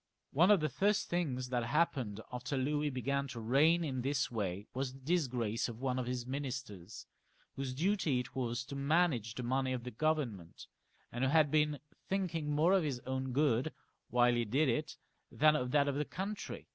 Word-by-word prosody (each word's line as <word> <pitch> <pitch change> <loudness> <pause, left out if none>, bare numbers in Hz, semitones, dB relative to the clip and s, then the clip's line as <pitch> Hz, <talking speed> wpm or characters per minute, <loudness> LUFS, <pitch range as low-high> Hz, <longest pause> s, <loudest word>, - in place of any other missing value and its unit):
One 170 +7 +4
of 205 -5 +6
the 155 - +2
first 205 +1 +1
things 135 -8 -1
that 125 -2 0
happened 130 -6 0
after 125 +2 -3
Louis 145 +3 0
began 140 +1 -1
to 125 -3 -7
reign 145 +9 +3
in 130 -5 -2
this 135 0 0
way 100 -3 -3
was 130 0 -2
the 135 - -13
disgrace 125 -8 0
of 115 -1 -8
one 130 -1 -1
of 125 - -3
his 125 -1 -3
minis 130 -1 -3
ters, 100 +1 -11 0.5
whose 135 -1 -4
duty 165 -4 +1
it 125 +2 -6
was 120 -1 -2
to 140 - -7
manage 140 -6 +1
the 125 - -4
money 130 +1 0
of 125 -2 -4
the 125 - -6
Govern 150 -3 0
ment, 85 -3 -13 0.5
and 120 +2 -3
who 130 - +3
had 155 -1 +4
been 150 -1 +2 0.3
thinking 170 -6 -1
more 155 +5 +3
of 195 - +4
his 140 -6 -2
own 130 0 -3
good 135 +1 +2 0.4
while 120 0 +4
he 120 0 +1
did 135 +7 +2
it 150 +6 -1 0.3
than 155 +1 +4
of 125 -4 -1
that 145 +1 +3
of 140 - +1
the 145 +2 0
country. 200 +6 -5
135 Hz, 200 wpm, -34 LUFS, 125-155 Hz, 0.5 s, of